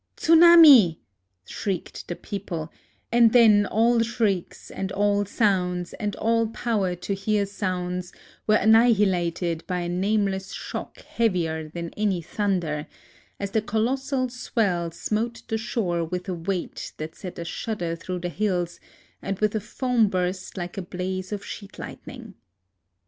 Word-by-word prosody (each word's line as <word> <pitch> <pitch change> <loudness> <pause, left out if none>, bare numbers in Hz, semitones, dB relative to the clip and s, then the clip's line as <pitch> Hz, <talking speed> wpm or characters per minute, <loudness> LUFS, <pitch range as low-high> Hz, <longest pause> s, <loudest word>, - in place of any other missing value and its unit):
" - - -50
Tsunami 320 - +8
I - - -34 0.3
" 90 -1 -50
shrieked 195 -4 -4
the 175 - -4
people; 170 -6 -6 0.4
and 235 -1 +5
then 215 -4 +6
all 230 +2 +3
shrieks 220 -5 -2
and 190 -1 -4
all 205 0 +2
sounds 180 -4 0
and 205 -1 -3
all 230 0 +1
power 215 -5 -1
to 180 +3 -4
hear 200 +1 0
sounds 180 -2 -3 0.4
were 215 - +5
annihilated 195 -7 +3
by 180 -1 -1
a 175 - -3
nameless 195 +1 0
shock - - -6
heavier 165 -8 -1
than 170 +1 -6
any 205 -4 0
thunder, 170 -4 -2 0.5
as 200 -1 -4
the 220 - +1
colos 225 +5 0
sal 265 -2 0
swell 205 -8 -1
smote 220 +7 -3
the 220 - -1
shore 185 -7 -1
with 180 +3 -4
a 185 - -2
weight 175 +1 -4
that 155 +1 -6
sent 180 -3 -9
a 170 - -5
shudder 175 -2 -3
through 180 +1 -5
the 175 - -2
hills, 180 -1 -1 0.4
and 195 - -3
with 215 0 +1
a 220 - -1
foam 240 +1 +1
burst 185 0 -3
like 175 +1 -5
a - - -2
blaze 185 +1 -4
of 205 -1 -4
sheet 200 -2 -9
lightning. 235 -5 -9
195 Hz, 155 wpm, -25 LUFS, 180-220 Hz, 0.5 s, Tsunami